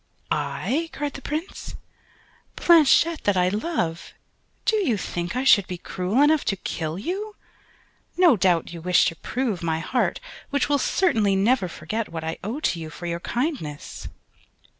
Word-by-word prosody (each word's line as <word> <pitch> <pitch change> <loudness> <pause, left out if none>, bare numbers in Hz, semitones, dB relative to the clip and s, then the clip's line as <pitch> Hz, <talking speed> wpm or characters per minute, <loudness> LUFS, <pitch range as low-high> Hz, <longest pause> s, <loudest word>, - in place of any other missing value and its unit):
"I," 325 +5 -1
cried 290 -1 -3
the 275 - -8
Prince, 310 +7 -5 0.8
"Blanchette 330 0 +5
that 205 -2 +3
I 180 0 +3
love: 195 - -2 0.5
do 440 - +3
you 275 - +1
think 175 +1 -4
I 255 - 0
should 205 -8 +5
be 180 - -5
cruel 190 +9 0
enough 305 0 +4
to 195 - +1
kill 160 -3 -4
you? 395 - -4 0.8
No 350 -7 +6
doubt, 175 -4 +1
you 170 - -7
wish 180 +1 +4
to 165 - -1
prove 235 -2 -2
my 165 -1 0
heart 245 +10 0 0.3
which 285 -1 +1
will 290 -1 +2
certainly 220 - +2
never 200 +1 +2
forget 205 +7 -4
what 165 -1 -5
I 160 +1 -4
owe 225 +9 -3
to 170 - 0
you 160 -1 -6
for 175 - -9
your 170 0 -2
kindness." 235 - -4
215 Hz, 160 wpm, -24 LUFS, 175-290 Hz, 0.8 s, No